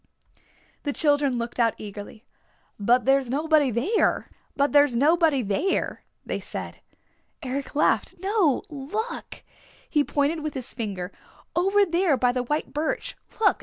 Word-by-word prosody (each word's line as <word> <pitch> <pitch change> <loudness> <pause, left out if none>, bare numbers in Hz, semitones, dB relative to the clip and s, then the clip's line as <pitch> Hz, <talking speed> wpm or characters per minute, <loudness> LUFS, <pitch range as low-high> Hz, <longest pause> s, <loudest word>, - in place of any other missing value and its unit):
The 285 - -2
children 290 -4 +2
looked 235 +1 -4
out 230 -2 +3
eagerly. 205 +1 -9 0.5
"But 240 +5 +3
there's 270 -1 +3
nobody 300 +1 +3
there," 260 - +1 1.9
they - - -3
said. - - -7 0.6
Eric 270 +2 -4
laughed. 300 - +2
"No, 385 - +2
look!" 315 - -5 0.4
He 295 -2 +2
pointed 290 +3 0
with 305 -1 -4
his 260 -1 -5
finger. 195 -6 -4 0.4
"Over 390 +3 +4
there 340 -4 +2
by 245 0 +3
the 250 0 -1
white 295 +5 -2
birch. 305 +2 -2 0.2
Look! 440 - +3
285 Hz, 120 wpm, -25 LUFS, 245-320 Hz, 1.9 s, Over